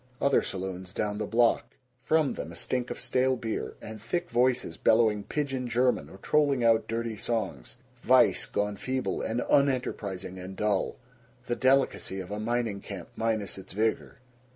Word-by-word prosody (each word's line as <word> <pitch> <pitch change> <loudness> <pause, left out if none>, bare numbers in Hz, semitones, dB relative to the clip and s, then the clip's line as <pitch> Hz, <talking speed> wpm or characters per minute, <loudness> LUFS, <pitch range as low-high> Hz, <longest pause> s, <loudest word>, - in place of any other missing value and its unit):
Other 140 -1 +4
saloons 95 -1 -5
down 105 0 -2
the - - -2
block. 120 +1 +2 0.3
From 155 0 +2
them 80 - -6
a - - -10
stink 125 +7 -2
of - - -5
stale 130 +1 +1
beer, 115 -3 -4
and 110 -1 -8
thick 175 +10 -2
voices 125 +1 +2
bellowing 110 -2 +3
pidgin 135 -3 -2
German 120 - +1
or 95 - -12
trolling 140 +2 +2
out 115 -1 +4
dirty 115 0 -2
songs 105 - -3 0.2
vice - - +4
gone 105 0 -1
feeble 130 +5 -2
and 115 +2 -1
unenterprising 105 -9 0
and 95 +1 -7
dull 105 -1 0 0.5
the 120 - -1
delicacy 130 -7 +2
of 95 +1 -7
a 105 - -3
mining 115 -2 -1
camp 95 -5 -8
minus 110 -4 -1
its 95 - -11
vigor. 110 +2 -1
115 Hz, 160 wpm, -28 LUFS, 100-125 Hz, 0.5 s, Other